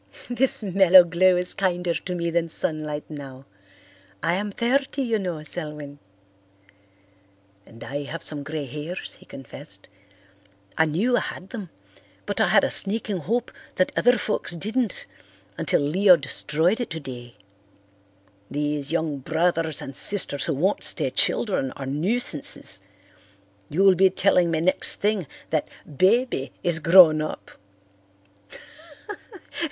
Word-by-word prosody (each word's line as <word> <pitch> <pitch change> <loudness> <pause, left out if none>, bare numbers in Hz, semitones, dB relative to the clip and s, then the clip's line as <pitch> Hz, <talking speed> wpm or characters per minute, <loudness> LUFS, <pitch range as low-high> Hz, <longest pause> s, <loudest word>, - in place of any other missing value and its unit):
"This 245 -1 +1
mellow 190 -2 +6
glow 180 +2 +2
is 180 0 +1
kinder 180 -2 -1
to 180 +2 -5
me 170 -1 -2
than 165 0 -1
sunlight 155 -2 -1
now. 135 -3 -10 0.8
I 165 - +1
am 205 +3 -2
thirty, 270 +5 -1
you 230 -3 0
know, 175 -5 -4
Selwyn." 150 -3 -5 1.7
"And 115 0 -13
I 140 +1 -5
have 165 +3 -7
some 150 -2 -1
grey 155 0 -5
hairs," 150 +7 -7
he - - -19
confessed. 135 -6 -10 0.9
"I 160 - +3
knew 205 +11 +1
I - - +2
had 185 - -7
them 210 -8 -7 0.6
but - - -2
I - - +3
had - - +4
a - - 0
sneaking 205 -1 +2
hope 230 +9 -2 0.2
that 185 - +1
other 245 0 +3
folks 210 -4 -2
didn't 220 +5 -2 0.5
until - - 0
Leo 180 +6 +5
destroyed 160 - 0
it 245 - -4
today. 125 -6 -8 1.1
These 145 0 -2
young 160 -4 -2
brothers 160 +1 -1
and 135 - -3
sisters 180 -7 +5
who 160 - -1
won't 185 +9 0
stay - - -1
children 185 - 0
are 135 - -8
nuisances. 150 - -1 0.9
You'll 190 +5 +4
be 190 +1 +4
telling 180 -2 +2
me 160 -1 -1
next 185 +3 +1
thing 205 -6 -1 0.2
that 155 -2 -1 0.2
'Baby' 185 - 0
is 170 -2 +2
grown 165 -1 +6
up." 155 - -6
170 Hz, 135 wpm, -23 LUFS, 150-195 Hz, 1.7 s, mellow